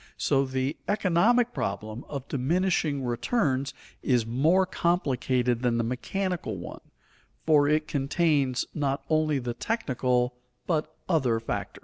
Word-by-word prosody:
So 135 0 +2
the 130 +2 -2
economic 215 +5 +3
problem 110 +4 -4
of 140 -2 -5
diminishing 150 0 0
returns 135 - 0 0.3
is 125 -4 +2
more 155 +11 +3
complicated 130 -9 0
than 120 -2 +1
the 115 - +1
mechanical 145 - -2
one, 85 - -8 0.6
for 150 -2 +5
it 155 +1 +2
contains 140 -2 +1
not 140 -1 -1
only 155 -2 +2
the 120 -2 -3
technical 125 - 0 0.3
but 155 -2 -1
other 130 -10 +2
factors. 115 - -4
140 Hz, 120 wpm, -27 LUFS, 125-165 Hz, 0.6 s, for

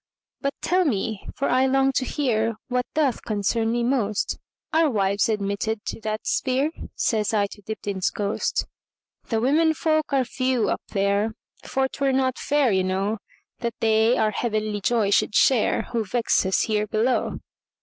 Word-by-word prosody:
"But 275 0 -1
tell 365 +2 +3
me, 220 - -2
for 275 - -1
I 260 +1 +3
long 270 0 +3
to 260 - 0
hearWhat 240 -2 -1
doth 285 -6 +1
concern 225 +1 0
me 240 0 0
most, 235 -5 0 0.3
Are 320 -1 +4
wives 200 -3 +1
admitted 210 +1 -2
to - - -5
that 215 0 -3
sphere?"Says 255 -5 -1
I 205 -1 +3
to 205 +1 -10
Dibdin's 200 -2 -2
ghost."The 210 +2 -4
women 315 +6 +3
folk 310 -1 0
are 270 -2 +2
few 255 -2 0
up - - -1
there; 200 +2 0 0.3
For 265 +1 0
't 280 - -6
were 270 -1 +3
not 260 -1 +1
fair, 290 -4 +2
you 190 -1 +2
know, 195 +4 -1 0.4
That 235 -2 -3
they 220 +2 +3
our 215 -1 +2
heavenly 215 -1 -2
joy 215 -1 +1
should 205 - +2
shareWho 230 -3 +2
vex 230 -4 +2
us 190 - +2
here 215 -1 0
below. 225 +5 0
225 Hz, 155 wpm, -24 LUFS, 210-265 Hz, 0.4 s, Are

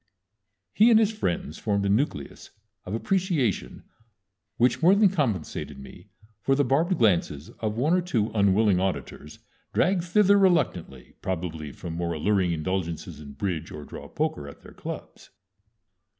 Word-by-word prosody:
He 220 +3 +5
and 225 -2 +6
his 220 -1 +3
friends 85 - -3
formed 100 -2 0
a - - +1
nucleus 100 - -2 0.4
of 100 - -2
appreciation 165 - -1 0.7
which 125 +4 +2
more 180 +4 +6
than 205 -1 +5
compensated 110 - -2
me 90 +8 -13 0.3
for 135 +6 +2
the 145 - +2
barbed 155 +8 +1
glances 85 - +1
of 110 -1 -2
one 150 +8 +2
or 180 - +3
two 115 -12 -1
unwilling 100 -1 +3
auditors 75 -5 -4 0.4
dragged 185 -1 +2
thither 200 +2 +4
reluctantly, 120 - 0
probably 80 -5 -4
from 80 +6 -7
more 85 0 -2
alluring 95 +2 +1
indulgences 85 -1 -3
in 70 -2 -10
bridge 80 0 -3
or 75 - -8
draw - - -9
poker 70 - -3
at 70 - -13
their - - -13
clubs. - - -8
100 Hz, 150 wpm, -26 LUFS, -, 0.7 s, and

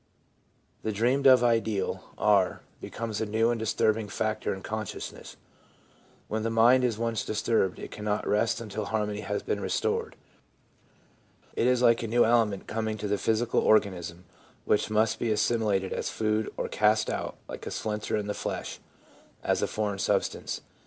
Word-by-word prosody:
The 110 - -2
dreamed 125 +7 +2
of 130 -2 +7
ideal, 115 -4 0
r, 100 -3 +3 0.2
becomes 110 -2 -4
a - - +1
new 110 +2 +2
and 120 - -2
disturbing 110 0 +1
factor 110 +1 -1
in 95 - -5
consciousness. 110 -2 -6 0.9
When 110 +1 -2
the 115 - -1
mind 120 +3 +5
is 120 -4 +1
once 115 -2 -1
disturbed 105 -3 0
it - - -8
cannot 105 0 -2
rest 115 +3 +1
until 110 -2 -5
harmony 105 -1 -2
has - - -3
been - - -1
restored. - - -1 1.4
It 120 - +2
is 125 -1 +3
like 115 -1 +5
a 115 - -3
new 120 +2 +4
element 110 -4 +2
coming 110 -1 -2
to 105 0 -4
the 100 0 0
physical 115 +1 +1
organism, 90 -4 +1 0.4
which 105 - +2
must 110 +1 +2
be 120 - -1
assimi 110 -2 +2
lated 95 - -6
as - - -2
food, 110 0 -1
or - - -2
cast 110 +1 +2
out, - - -3
like - - -8
a - - -2
splinter 105 0 -2
in 105 - -2
the 105 - -2
flesh, - - -5 0.6
as - - +1
a - - +1
foreign 105 -2 -2
substance. - - -1
110 Hz, 165 wpm, -28 LUFS, 105-115 Hz, 1.4 s, of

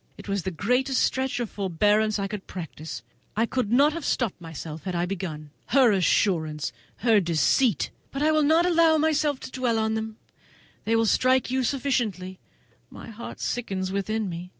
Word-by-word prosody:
It - - -11
was 200 -1 -1
the 190 - -3
greatest 250 - 0
stretch 260 -1 0
of 240 - -1
forbearance 210 +3 +1
I 200 -1 -2
could 200 -1 -7
practise. 160 -5 -7 0.3
I 225 - +3
could 240 -3 -2
not 285 +5 +5
have 335 -1 -5
stopped 230 -10 -1
myself 160 -1 -8
had 185 -2 -3
I 175 0 0
begun. 170 -6 -5 0.2
Her 255 -3 +5
assurance! 165 -5 +1 0.3
her 225 -3 +6
deceit! 175 - +2 0.2
but 275 +2 -3
I 310 - +4
will 310 0 +3
not 320 +4 +4
allow 335 -2 +4
myself 305 -2 +1
to - - -8
dwell 250 -3 0
on 220 0 0
them; 220 0 -4 0.7
they 225 +2 +2
will 225 0 +3
strike 255 +3 +2
you 260 0 +1
sufficiently. 230 -9 -1 0.5
My - - -10
heart 230 +2 -9
sickens 190 -6 -2
within 210 +2 -1
me. 175 0 -6
220 Hz, 175 wpm, -25 LUFS, 185-260 Hz, 0.7 s, her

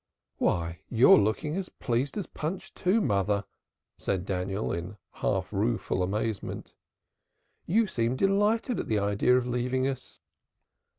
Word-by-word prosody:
"Why 85 0 0
you're 120 +2 +7
looking 110 +10 0
as 190 -1 -3
pleased 125 - -2
as 200 - -2
Punch 165 +5 -5
too, 195 +5 +2
mother," 100 - +1 0.6
said 95 -2 -1
Daniel, 95 +2 -2
in 85 +5 -5
half - - -2
rueful 75 +8 0
amazement. 105 +3 -3 0.9
"You 220 +6 +3
seem 120 - 0
delighted 205 - +2
at - - -3
the 110 - +1
idea 105 +5 +3
of 125 - 0
leaving 125 +2 0
us." 135 -2 -5
120 Hz, 130 wpm, -28 LUFS, 100-160 Hz, 0.9 s, you're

